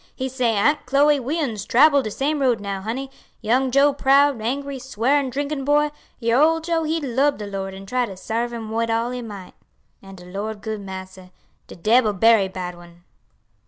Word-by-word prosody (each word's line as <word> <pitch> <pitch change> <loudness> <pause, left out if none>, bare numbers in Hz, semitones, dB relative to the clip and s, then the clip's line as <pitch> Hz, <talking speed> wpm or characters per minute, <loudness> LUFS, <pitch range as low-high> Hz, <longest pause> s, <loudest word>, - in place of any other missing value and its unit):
He 260 0 -3
say, 245 -3 0
'Aunt 290 +9 +1
Chloe 285 +2 +4
we 280 +6 -2
uns 225 -10 -2
trabble 280 +5 +5
de 215 - -4
same 290 +7 -1
road 250 -5 +2
now, 200 -1 -4
honey: 260 +6 -4 0.3
young 250 +4 +1
Joe 280 +2 +4
proud, 275 -2 +3
angry, 275 +4 -3
swearing 265 +3 0
drinkin' 285 +2 -3
boy, 295 +1 +2 0.3
your 235 +2 +2
Ole 325 +1 +4
Joe 325 0 -1
he 320 +1 -1
lub 280 +1 +1
de 210 - -6
Lord 195 -1 -5
an' 195 0 -10
try 250 +4 -1
to 190 -3 -9
sarve 230 +5 -3
Him 225 -2 -6
wid 230 +1 -1
all 230 +2 0
he 250 0 -4
might. 205 -5 -9 0.5
And 195 -1 -12
de 180 - -13
Lord 205 +3 -5
good 220 -2 -4
Massa. 190 -1 -9 0.4
De - - -11
debbil 215 +4 +3
berry 215 0 +4
bad 180 -1 -6
one.'" 175 0 -16
240 Hz, 195 wpm, -22 LUFS, 205-280 Hz, 0.5 s, trabble